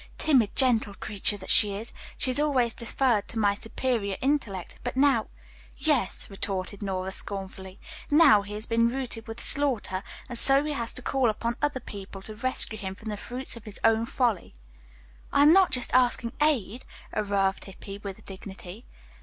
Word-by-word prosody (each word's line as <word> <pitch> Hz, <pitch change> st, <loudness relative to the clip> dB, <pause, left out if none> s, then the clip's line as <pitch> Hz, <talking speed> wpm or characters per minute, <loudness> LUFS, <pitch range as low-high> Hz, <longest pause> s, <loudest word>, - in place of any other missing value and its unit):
Timid, 255 Hz, -9 st, +2 dB
gentle 230 Hz, -6 st, +4 dB
creature 205 Hz, 0 st, -1 dB
that 190 Hz, -, -3 dB
she 205 Hz, -2 st, +4 dB
is, 220 Hz, +4 st, -7 dB, 0.2 s
she 260 Hz, -, +2 dB
has 255 Hz, -, +4 dB
always 260 Hz, -6 st, +1 dB
deferred 235 Hz, -2 st, 0 dB
to 230 Hz, -, -5 dB
my 205 Hz, -2 st, +2 dB
superior 220 Hz, -1 st, -3 dB
intellect, 245 Hz, -10 st, -2 dB
but 245 Hz, +1 st, -5 dB
now 270 Hz, -5 st, +3 dB, 0.2 s
" -, -, -25 dB
"Yes," -, -, 0 dB
retorted 195 Hz, 0 st, -3 dB
Nora 190 Hz, -1 st, -3 dB
scornfully, 190 Hz, -1 st, -5 dB, 0.3 s
"now, 290 Hz, -8 st, +6 dB
he 205 Hz, +1 st, -8 dB
has 215 Hz, +1 st, -1 dB
been 230 Hz, 0 st, +2 dB
routed 240 Hz, -3 st, -3 dB
with 225 Hz, +1 st, -7 dB
slaughter, 255 Hz, -11 st, +2 dB, 0.3 s
and 240 Hz, -2 st, +5 dB
so 275 Hz, +1 st, +8 dB
he 300 Hz, -, -3 dB
has 235 Hz, -4 st, -3 dB
to 255 Hz, -, -2 dB
call 265 Hz, -3 st, +1 dB
upon 230 Hz, +2 st, -3 dB
other 290 Hz, -3 st, -1 dB
people 195 Hz, -4 st, -10 dB
to 215 Hz, -, -7 dB
rescue 225 Hz, -1 st, -2 dB
him 190 Hz, -2 st, -6 dB
from 220 Hz, +2 st, -9 dB
the 210 Hz, -, -3 dB
fruits 250 Hz, +6 st, -2 dB
of 230 Hz, -, -13 dB
his 210 Hz, -2 st, -8 dB
own 225 Hz, 0 st, +2 dB
folly." 235 Hz, -, -1 dB, 0.8 s
"I 285 Hz, -, +4 dB
am 300 Hz, +2 st, +7 dB
not 375 Hz, -8 st, +4 dB, 0.2 s
asking 245 Hz, -2 st, +2 dB
aid," 255 Hz, -6 st, 0 dB, 0.3 s
averred 200 Hz, -2 st, -1 dB
Hippy 195 Hz, +1 st, -10 dB
with 200 Hz, -2 st, -9 dB
dignity. 190 Hz, +2 st, -10 dB
225 Hz, 175 wpm, -26 LUFS, 200-255 Hz, 0.8 s, so